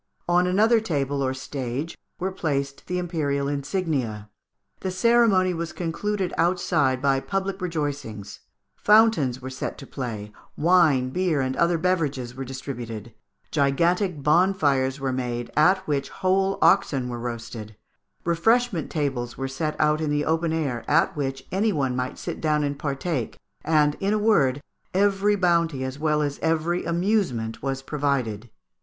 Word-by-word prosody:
On 175 +1 +3
another 220 +5 +4
table 145 -9 -1
or 130 -1 0
stage 130 +3 -4 0.2
were 190 +2 -2
placed 140 -6 -3
the 180 - -2
Imperial 150 -6 -1
insignia. 140 - -2 0.5
The 190 - -3
ceremony 195 -2 +3
was 170 -1 -4
concluded 185 +3 -2
outside 150 -6 +1
by 135 -1 +3
public 195 +4 -3
rejoicings: 145 - -4 0.4
fountains 205 - +4
were 130 - -5
set 130 - -5
to 135 - -10
play; 110 -7 -5 0.3
wine, 155 -7 +4
beer, 180 -2 +1
and 130 0 -1
other 170 0 +2
beverages 150 -8 -1
were 135 +1 -5
distributed; 120 -4 -7 0.4
gigantic 165 +3 +1
bonfires 150 -5 +2
were 135 -1 -1
made, 120 -2 -3
at 185 +5 +4
which 145 -2 -1
whole 190 +1 +1
oxen 140 -10 +3
were 120 -1 -5
roasted; 115 -2 -6 0.5
refreshment 200 +3 +2
tables 135 -6 -2
were 135 - -2
set 155 +3 -3
out 150 0 +2
in 155 - -1
the 145 0 0
open 160 +1 +1
air, 140 -8 -2
at 165 +3 +3
which 135 -2 -3
any 210 +4 +2
one 135 -7 0
might 125 0 -3
sit - - -5
down 150 -1 +1
and 140 -1 -2
partake, 140 -3 -3 0.3
and, 150 -2 +3
in 200 +2 +1
a - - +2
word, 145 -11 +2 0.3
every 200 +1 +3
bounty 170 -7 +1
as 130 +2 -5
well 150 -1 +1
as 145 -1 -3
every 165 +2 0
amusement 170 - 0
was 135 0 -3
provided. 130 -7 -2
150 Hz, 150 wpm, -24 LUFS, 130-180 Hz, 0.5 s, another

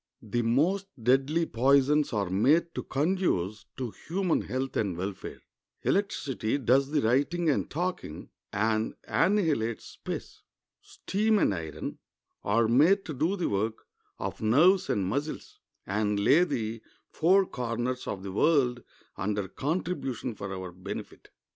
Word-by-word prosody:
The 115 +2 -1
most 160 +13 +1
deadly 135 +8 +2
poisons 140 +4 +3
are 100 -4 -1
made 155 - +3
to - - -3
conduce 135 - -1
to 125 -4 -3
human 180 - -1
health 130 +1 -3
and 95 -5 -1
welfare. 95 +2 -6 0.4
Electricity 140 - 0
does 135 +1 +3
the 150 -1 +1
writing 145 +8 +2
and - - -1
talking, 175 - -4 0.2
and 110 +1 0
annihilates 155 - +1
space. - - -7 0.4
Steam 215 +2 0
and 150 - +3
iron 80 -4 -5 0.4
are 115 +3 +2
made 155 - +4
to 160 - -5
do 160 +8 0
the 180 - -1
work 110 +3 -2 0.3
of - - -5
nerves 160 - +4
and 100 -2 +1
muscles, 140 +10 -4 0.3
and 105 +1 0
lay 140 - +5
the 115 -7 -3 0.3
four 190 +4 +4
corners 125 -2 -3
of 95 -1 -4
the 100 - -5
world 125 - +2 0.4
under 100 0 -1
contribution 145 - -3
for 100 -2 -6
our 95 -1 -5
benefit. 90 +1 -8
130 Hz, 135 wpm, -28 LUFS, 105-165 Hz, 0.4 s, lay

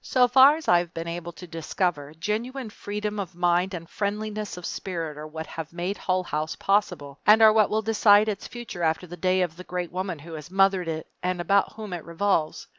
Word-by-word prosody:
So 250 -1 +3
far 265 +4 +7
as 320 - -8
I 175 - +6
have 175 -1 -6
been 165 0 -4
able 170 0 -5
to 180 - -10
discover, 165 -2 -2
genuine 225 +7 -3
freedom 210 0 -4
of 190 -3 -5
mind 175 +2 +1
and 165 -1 -8
friendliness 210 +1 -3
of 180 - -7
spirit 165 -5 -4
are 150 +1 -7
what 160 +1 -6
have 160 0 -7
made 175 +3 -3
Hull 185 -1 0
House 155 -2 -3
possible 180 -8 0
and 215 +1 +8
are 220 -1 +8
what 215 -2 +4
will 220 +1 0
decide 210 -1 +5
its 205 -2 -3
future 240 -7 -8
after 160 +2 0
the 175 0 -9
day 185 +2 +2
of 170 -2 -4
the 185 - -8
great 180 -1 -4
woman 185 -1 -3
who 165 +3 -11
has 155 0 -8
mothered 195 -1 +3
it 160 -1 -3 0.2
and 180 0 -1
about 200 +3 +2
whom 215 -4 -7
it 170 -3 -5
revolves. 170 -1 -1
180 Hz, 220 wpm, -25 LUFS, 165-210 Hz, 0.2 s, and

